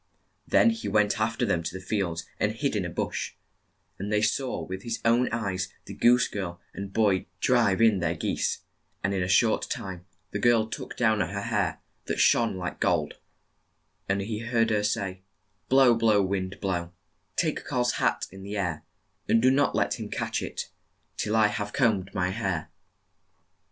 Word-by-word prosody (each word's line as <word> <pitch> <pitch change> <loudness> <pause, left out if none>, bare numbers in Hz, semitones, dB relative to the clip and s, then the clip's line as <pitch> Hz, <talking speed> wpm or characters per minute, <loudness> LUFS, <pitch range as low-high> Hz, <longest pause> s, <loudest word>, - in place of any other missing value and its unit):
Then 230 - +5
he 225 0 -5
went 105 +2 +2
aft 110 +3 0
er - - +4
them 90 -6 +1
to 85 - -4
the 95 - -12
fields, 90 -5 -1
and - - +1
hid - - -1
in - - 0
a - - -3
bush, - - -3 0.7
and 100 +2 -4
there 105 0 +2
saw 130 +3 0
with 95 +1 -6
his 115 +2 -3
own 120 +2 +4
eyes 95 -4 -2
the - - -8
goose 125 +1 +4
girl 85 -4 -5
and 100 0 -6
boy 100 -4 +2
drive 115 -4 +3
in 110 -4 +5
their 85 -1 0
geese, 80 - -1 0.4
and 95 - +1
in 95 - 0
a 90 - 0
short 110 +4 +3
time 90 -1 -5 0.2
the 100 - -2
girl 115 0 +4
took 110 - -7
down 110 -3 +3
her 100 +2 -1
hair, 105 -6 -1 0.2
that - - -2
shone 115 -5 +4
like 90 -1 -5
gold, - - 0 0.9
and 100 0 +1
he 105 +2 -3
heard 115 -1 +1
her 105 -1 +2
say, 95 -3 -2 0.2
" 105 - -45
Blow, 130 -2 +6
blow, 115 -2 +3
wind, 95 0 -2
blow; 85 -3 -2 0.4
Take 160 -4 0
Karl's 125 -3 0
hat - - +1
in 95 +1 -11
the 100 +2 -5
air; 90 -6 -2 0.5
And 115 - +5
do 130 +3 +5
not 140 +2 +2
let - - 0
him - - -5
catch - - -2
it - - -5 0.4
Till 105 +1 -1
I 110 -1 +5
have 105 -1 -2
combed 105 -7 +1
my 90 -2 0
hair." 95 -6 -2
105 Hz, 185 wpm, -27 LUFS, 95-115 Hz, 0.9 s, Blow